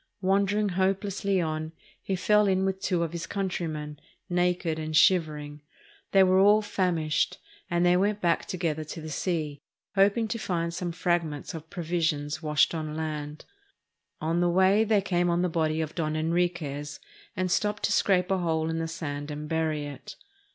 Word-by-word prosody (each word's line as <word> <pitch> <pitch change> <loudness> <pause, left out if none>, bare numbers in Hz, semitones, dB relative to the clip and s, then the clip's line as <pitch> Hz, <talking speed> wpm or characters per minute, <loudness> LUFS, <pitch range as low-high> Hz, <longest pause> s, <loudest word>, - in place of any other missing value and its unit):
Wandering 200 +2 +2
hopelessly 195 +1 0
on, 155 -1 -2 0.3
he 195 - -2
fell 210 +3 +3
in 190 0 +2
with 190 0 -2
two 180 -4 0
of 165 - -3
his 170 0 -5
countrymen, 155 -6 -3 0.3
naked 175 -2 +1
and 155 0 -1
shivering. 150 -4 +2 0.5
They 195 -1 +6
were 185 0 +4
all 205 +2 +5
famished, 170 -6 0 0.3
and 175 +1 +2
they 175 0 +5
went 200 +3 +1
back 170 -4 +1
together 165 -5 -2
to 155 +2 -8
the 155 0 -7
sea, 150 -3 -2 0.3
hoping 205 +3 +3
to 230 - -2
find 170 -4 -2
some 175 0 -3
frag 175 0 +1
ments 150 -3 -6
of 160 0 -8
provisinos 160 -4 -1
washed 150 0 +2
on 155 -2 -4
land. 150 -1 -5 0.7
On 165 +2 0
the 175 - +3
way 190 +4 +4
they 215 -2 +3
came 175 -2 +1
on 170 +1 +1
the 180 - +1
body 160 -1 0
of 155 -1 -4
Don 155 -2 -2
Enriquez 160 -3 -1 0.4
and 185 -1 0
stopped 210 +2 0
to - - +1
scrape 185 -1 +2
a 190 - +2
hole 160 -2 0
in 165 - -2
the 165 - -2
sand 145 -3 -5
and 150 0 -5
bury 155 -2 -1
it. 140 -3 -9
170 Hz, 175 wpm, -27 LUFS, 155-190 Hz, 0.7 s, They